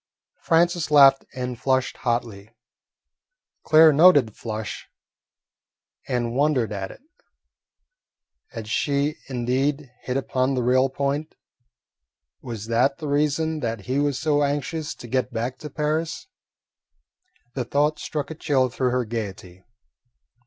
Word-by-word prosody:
Francis 170 Hz, -1 st, +2 dB
laughed 135 Hz, -2 st, +6 dB
and 125 Hz, -2 st, -4 dB
flushed 130 Hz, -1 st, 0 dB
hotly. 115 Hz, -4 st, -3 dB, 1.1 s
Claire 155 Hz, 0 st, +6 dB
noted 150 Hz, -4 st, +6 dB
the -, -, -21 dB
flush 110 Hz, -1 st, -6 dB, 1.2 s
and 120 Hz, -3 st, -1 dB
wondered 135 Hz, -5 st, +1 dB
at 95 Hz, -1 st, -4 dB
it. -, -, -13 dB, 1.5 s
Had 115 Hz, -4 st, -8 dB
she 140 Hz, +6 st, 0 dB
indeed 130 Hz, +3 st, -1 dB
hit 125 Hz, +1 st, -2 dB
upon 130 Hz, 0 st, 0 dB
the 125 Hz, -, 0 dB
real 130 Hz, +2 st, +3 dB
point? 140 Hz, +3 st, -3 dB, 1.1 s
Was 115 Hz, -5 st, -6 dB
that 125 Hz, +5 st, +1 dB
the 155 Hz, -, -6 dB
reason 150 Hz, +2 st, 0 dB
that 115 Hz, -5 st, -3 dB
he 130 Hz, +7 st, -2 dB
was 145 Hz, -2 st, 0 dB
so 145 Hz, +2 st, +1 dB
anxious 145 Hz, +2 st, -2 dB
to 120 Hz, -, -11 dB
get 130 Hz, +1 st, -1 dB
back 120 Hz, +2 st, -3 dB
to 150 Hz, -, -7 dB
Paris? 155 Hz, -, -2 dB, 1.3 s
The 130 Hz, -, -2 dB
thought 145 Hz, +5 st, 0 dB
struck 150 Hz, 0 st, -4 dB
a -, -, -3 dB
chill 135 Hz, -4 st, +1 dB
through 125 Hz, +1 st, -1 dB
her 125 Hz, 0 st, 0 dB
gaiety. 95 Hz, -5 st, -6 dB
135 Hz, 125 wpm, -23 LUFS, 120-150 Hz, 1.5 s, laughed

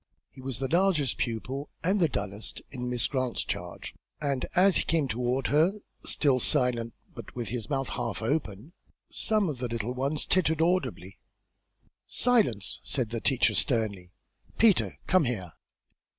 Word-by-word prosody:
He 130 Hz, -, -13 dB
was 130 Hz, -2 st, -5 dB
the 135 Hz, -, -2 dB
largest 170 Hz, -5 st, +2 dB
pupil, 130 Hz, +5 st, -3 dB
and 190 Hz, +4 st, +2 dB
the 165 Hz, -4 st, +3 dB
dullest, 100 Hz, -3 st, -4 dB
in 125 Hz, -2 st, -4 dB
Miss 125 Hz, -1 st, +1 dB
Grant's 130 Hz, -3 st, -1 dB
charge, 90 Hz, 0 st, -5 dB, 0.3 s
and 140 Hz, -4 st, -1 dB
as 190 Hz, +1 st, +6 dB
he -, -, +2 dB
came 160 Hz, -4 st, +1 dB
toward 125 Hz, +2 st, -1 dB
her, 160 Hz, +6 st, +4 dB, 0.3 s
still 135 Hz, -4 st, +2 dB
silent, 120 Hz, -2 st, +2 dB, 0.2 s
but -, -, -10 dB
with 120 Hz, -5 st, -3 dB
his 115 Hz, -1 st, -4 dB
mouth 135 Hz, -2 st, -1 dB
half -, -, -3 dB
open, 125 Hz, -, -2 dB, 0.4 s
some 215 Hz, -3 st, +1 dB
of 145 Hz, -6 st, -4 dB
the 125 Hz, -, -2 dB
little 115 Hz, +1 st, -3 dB
ones 140 Hz, +4 st, -1 dB
tittered 160 Hz, -4 st, +2 dB
audibly. 160 Hz, -, 0 dB, 0.9 s
"Silence!" 210 Hz, -, +1 dB
said 125 Hz, -5 st, -2 dB
the 115 Hz, -1 st, -3 dB
teacher, 135 Hz, -3 st, +3 dB
sternly. 105 Hz, -8 st, 0 dB, 0.5 s
"Peter, 220 Hz, -4 st, +4 dB
come 185 Hz, -5 st, +4 dB
here." 95 Hz, -9 st, -3 dB
130 Hz, 150 wpm, -28 LUFS, 115-160 Hz, 0.9 s, as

